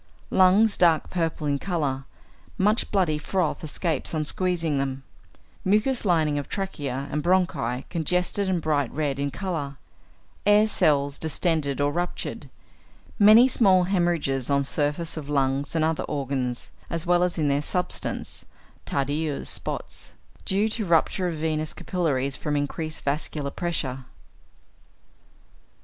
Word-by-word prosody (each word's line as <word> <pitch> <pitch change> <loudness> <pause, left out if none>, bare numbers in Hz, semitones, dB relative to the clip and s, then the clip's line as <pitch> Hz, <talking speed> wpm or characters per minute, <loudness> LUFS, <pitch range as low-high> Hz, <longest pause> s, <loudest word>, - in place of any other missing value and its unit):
Lungs 195 +3 +5
dark 165 -3 +3
purple 165 -3 -1
in 140 -1 0
colour; 145 -8 -2 0.5
much 210 +4 +2
bloody 175 -7 +1
froth 180 0 -1
escapes 160 0 -2
on 155 -1 -1
squeezing 165 -4 0
them; 135 0 -3 0.6
mucous 215 +6 +2
lining 155 -5 +2
of 140 - -7
trachea 140 -9 -3
and 150 - -1
bronchi 175 -9 +1
congested 180 +4 0
and 175 -4 0
bright 145 -5 +1
red 145 -3 -2
in 140 0 0
colour; 145 -5 -4 0.7
air 205 +1 +5
cells 145 -8 +2
distended 160 -3 0
or 145 0 +2
ruptured; 175 +3 -4 0.7
many 215 +4 +8
small 190 -8 +4
hæmorrhages 170 -9 0
on 140 0 +2
surface 150 +4 -1
of 145 -2 -6
lungs 140 +1 0
and 160 -1 +3
other 160 0 0
organs, 130 -4 -3 0.2
as 165 0 -2
well 175 0 +3
as 180 -1 0
in 155 -2 +1
their 140 0 +2
substance 180 +4 -2 0.4
(Tardieu's 145 +2 -1
spots), - - -5 0.3
due 200 +3 +2
to 220 0 -2
rupture 180 +1 +2
of 170 - -2
venous 155 0 -2
capillaries 140 -7 -1
from 150 +1 -2
increased 155 +2 -3
vascular 145 0 -1
pressure. 135 -7 -3
155 Hz, 130 wpm, -25 LUFS, 140-180 Hz, 0.7 s, many